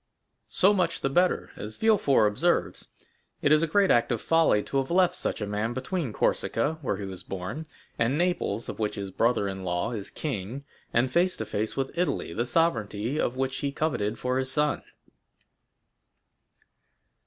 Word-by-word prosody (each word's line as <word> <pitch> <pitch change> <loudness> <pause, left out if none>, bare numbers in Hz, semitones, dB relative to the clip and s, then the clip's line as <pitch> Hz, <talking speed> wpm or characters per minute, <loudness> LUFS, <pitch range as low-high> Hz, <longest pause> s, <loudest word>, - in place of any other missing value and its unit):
"So 195 +3 +4
much 180 -4 0
the 135 - 0
better. 180 +5 +2
As 105 +1 -7
Villefort 205 - +4
observes, 105 - 0 0.6
it 145 - +3
is 155 0 +6
a 165 - +1
great 195 +4 +3
act 120 0 +3
of 120 - 0
folly 165 -10 +3
to 140 - -3
have 135 - -2
left 180 0 +3
such 180 - -2
a - - 0
man 105 +3 -2
between 135 +2 -3
Corsica, 155 +8 0
where 115 -8 -1
he 100 - -5
was 95 -2 -7
born, 95 - -6 0.3
and 120 +5 +2
Naples, 175 - 0
of - - -6
which 105 -1 -1
his 100 -1 -5
brother 115 0 +1
in 95 -1 -5
law 90 +5 -1
is 105 -5 -5
king, 130 -1 -4 0.3
and 120 +2 +2
face 180 +4 +2
to 110 - -3
face 110 +4 -3
with 135 -1 -2
Italy, 165 - -1
the 120 +5 -1
sovereignty 120 -4 0
of 120 - 0
which 135 0 -1
he 140 - -2
coveted 120 -8 -1
for 125 +1 -1
his 130 0 -1
son." 150 +1 +1
130 Hz, 175 wpm, -27 LUFS, 105-160 Hz, 0.6 s, is